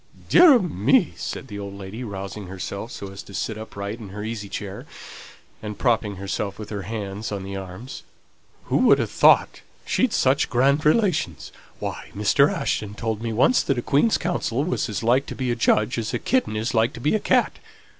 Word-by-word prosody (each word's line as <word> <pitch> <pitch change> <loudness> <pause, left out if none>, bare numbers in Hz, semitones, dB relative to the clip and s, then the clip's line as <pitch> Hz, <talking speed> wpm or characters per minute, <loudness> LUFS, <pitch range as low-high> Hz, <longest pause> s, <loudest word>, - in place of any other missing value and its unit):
"Dear 345 -4 +8
ah - - +7
me!" 165 - +2
said - - -5
the 105 - -7
old 100 -1 -7
lady, 100 +5 -7
rousing 100 -2 -6
herself 100 +4 -6
so 100 -1 -7
as 95 +1 -8
to 100 - -12
sit 110 - -2
upright 105 0 -6
in 105 -4 -9
her 105 +2 -7
easy 110 -2 -5
chair, 100 -1 -6 0.7
and 105 -2 -6
propping 110 -5 +1
herself 100 +1 -4
with 105 -1 -8
her 100 -2 -3
hands 105 +1 -5
on 100 -2 -4
the 100 +1 -6
arms; 95 +7 -8 0.6
"who - - 0
would - - +5
ha' - - +1
thought - - +4 0.2
she'd 255 -3 +1
such 135 -4 +2
grand 140 +5 +2
relations! 155 - +1 0.3
Why, - - -6
Mr. - - +3
Ashton 105 -1 -2
told 110 -1 -3
me 115 -1 -2
once 130 - +4
that 135 - 0
a 120 - -2
Queen's 150 +11 +3
counsel 145 -7 -1
was 180 -7 -1
as 105 - -3
like 125 +4 +2
to - - -6
be 130 -2 -1
a - - 0
judge 110 0 +2
as 115 - -3
a - - +2
kitten 255 - 0
is 110 +3 -2
like 115 0 +2
to - - -9
be 145 +6 +1
a 215 - +2
cat. - - +1
110 Hz, 205 wpm, -23 LUFS, 100-130 Hz, 0.7 s, Dear